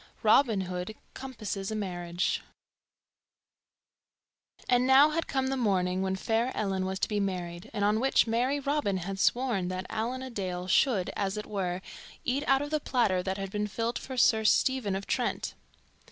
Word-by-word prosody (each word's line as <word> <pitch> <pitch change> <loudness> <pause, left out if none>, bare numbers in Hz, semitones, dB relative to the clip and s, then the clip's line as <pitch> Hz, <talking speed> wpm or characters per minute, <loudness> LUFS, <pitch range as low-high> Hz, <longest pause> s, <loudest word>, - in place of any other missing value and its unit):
Robin 220 -2 +4
Hood 180 +3 -4 0.2
Compasses 215 -7 -5
a 220 - -3
Marriage 175 -3 -2 2.3
AND 250 0 +3
NOW 275 +3 +7
had 330 +1 -1
come 265 -1 0
the 270 - 0
morning 190 -6 +1
when 190 0 0
fair 225 +6 0
Ellen 190 -2 -1
was 190 0 -2
to - - +2
be 210 -1 -1
married, 180 -3 -3
and 205 - 0
on 210 +1 +2
which 270 +3 +3
merry 245 +5 +1
Robin 280 -8 0
had 195 +2 -5
sworn 235 -5 +1
that 185 0 -4
Allan 240 +4 -2
a 260 - -7
Dale 185 -4 -3
should, 195 -1 +2
as 200 +1 -1
it 210 - -4
were, 185 -2 -3 0.4
eat 265 +3 0
out 270 +1 +4
of 290 - -6
the 305 - +1
platter 225 -10 +1
that 190 +1 -3
had 195 -1 -5
been 210 0 -1
filled 230 +3 -2
for 260 -1 -7
Sir 220 -2 +4
Stephen 220 -2 +2
of 195 +1 -4
Trent. - - -1
210 Hz, 175 wpm, -29 LUFS, 190-255 Hz, 2.3 s, NOW